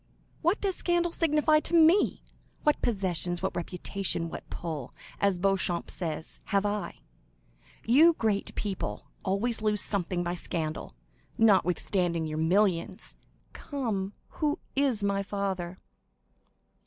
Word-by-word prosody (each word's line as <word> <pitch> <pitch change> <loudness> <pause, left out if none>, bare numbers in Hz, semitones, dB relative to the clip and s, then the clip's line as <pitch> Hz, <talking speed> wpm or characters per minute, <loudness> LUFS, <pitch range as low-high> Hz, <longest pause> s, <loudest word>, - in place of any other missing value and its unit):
What 345 +6 +2
does 390 -3 -1
scandal 345 -1 +1
signify 305 -2 +3
to 340 - -2
me? 335 +4 +5 0.4
What 300 - +2
possessions, 180 -5 0
what - - -1
reputation, 175 0 -2
what - - -8
'pull,' 155 -7 -5 0.2
as 200 -2 +2
Beauchamp 185 -2 0
says,—have 175 +4 -2
I? 205 0 -3 0.8
You 305 +9 +6
great 215 -6 -1
people 200 -3 -4
always 220 +4 0
lose 210 -1 +2
something 180 -3 0
by 175 0 -2
scandal, 160 - -3 0.4
notwithstanding 180 -4 +3
your 155 0 -3
millions. 175 +1 +1 0.4
Come, 215 -9 -3 0.3
who 300 +1 +1 0.2
is 270 -7 +1
my 200 0 +1
father?" 190 -3 -3
200 Hz, 115 wpm, -29 LUFS, 175-245 Hz, 0.8 s, You